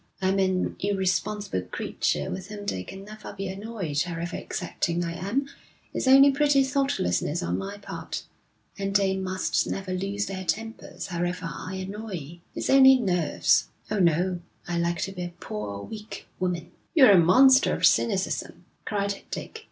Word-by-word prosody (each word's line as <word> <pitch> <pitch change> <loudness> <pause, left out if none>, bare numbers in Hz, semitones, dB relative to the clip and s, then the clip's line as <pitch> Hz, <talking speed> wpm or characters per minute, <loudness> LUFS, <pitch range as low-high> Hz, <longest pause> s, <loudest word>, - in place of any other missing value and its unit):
I'm 190 +1 +1
an 185 -1 0
irresponsible 200 - -1
creature 90 - -2
with 185 0 -5
whom 205 -1 -8
they 95 - -2
can 195 - -9
never 215 0 -9
be 195 0 -4
annoyed 190 -7 -3
however 175 0 -3
exacting 170 +1 -2
I 170 - -3
am 200 +11 -1 0.5
it's - - -2
only 275 +2 +8
pretty 285 -1 +4
thoughtlessness 260 - 0
on - - -1
my 200 +1 -5
part 200 - -6 0.6
and 195 0 -2
they 195 -1 +3
must 185 0 0
never 190 -1 -3
lose 195 +2 -2
their 190 -1 -5
tempers 225 +6 -4
however 175 0 -2
I 185 - -6
annoy 190 -6 -7 0.2
it's - - -1
only 265 0 +8
nerves. 180 -8 +2 0.2
Oh, 215 - +1
no, 175 +1 +2 0.3
I 175 -1 -1
like 170 0 0
to 195 - -2
be 180 -2 -5
a 175 - -7
poor, 100 -1 -5
weak 215 - -8
woman.' 175 -2 -2 0.2
'You're 265 -9 +8
a 190 - +7
monster 260 +11 +6
of - - +2
cynicism,' 195 -4 +1 0.2
cried 200 -1 -2
Dick. - - -6
195 Hz, 160 wpm, -26 LUFS, 175-210 Hz, 0.6 s, only